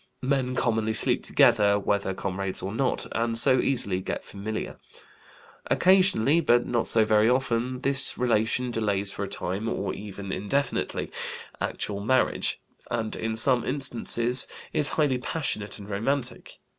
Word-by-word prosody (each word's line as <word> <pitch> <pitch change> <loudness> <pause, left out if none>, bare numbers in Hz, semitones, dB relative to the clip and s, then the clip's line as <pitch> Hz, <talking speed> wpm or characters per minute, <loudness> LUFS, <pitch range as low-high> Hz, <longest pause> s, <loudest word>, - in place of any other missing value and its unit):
Men 130 -1 0
commonly 110 -3 0
sleep - - +2
together, 105 -4 +3
whether 100 -1 -1
comrades 95 0 0
or 95 +2 -4
not, 130 +2 0
and 115 0 0
so 130 +2 +6
easily 100 -10 +1
get - - -4
familiar. 105 +2 -6 0.9
Occasionally, 185 - +3
but 120 -5 +3
not 120 -2 -1
so 110 -1 +3
very 110 +1 +3
often, 125 0 -1
this 135 -1 +1
relation 120 +1 0
delays 100 -3 0
for 100 - -5
a - - -3
time, 100 +6 -4
or 100 - -3
even 100 -1 -8
indefinitely, 105 +10 -2 0.5
actual 100 -1 -3
marriage, 130 +5 +1 0.3
and 110 -1 -1
in 110 0 -3
some 120 +2 +4
instances 125 -2 0 0.3
is 150 - +3
highly 145 -5 +2
passionate 105 -8 -2
and 100 - -11
romantic. 120 +4 -3
115 Hz, 140 wpm, -26 LUFS, 105-130 Hz, 0.9 s, so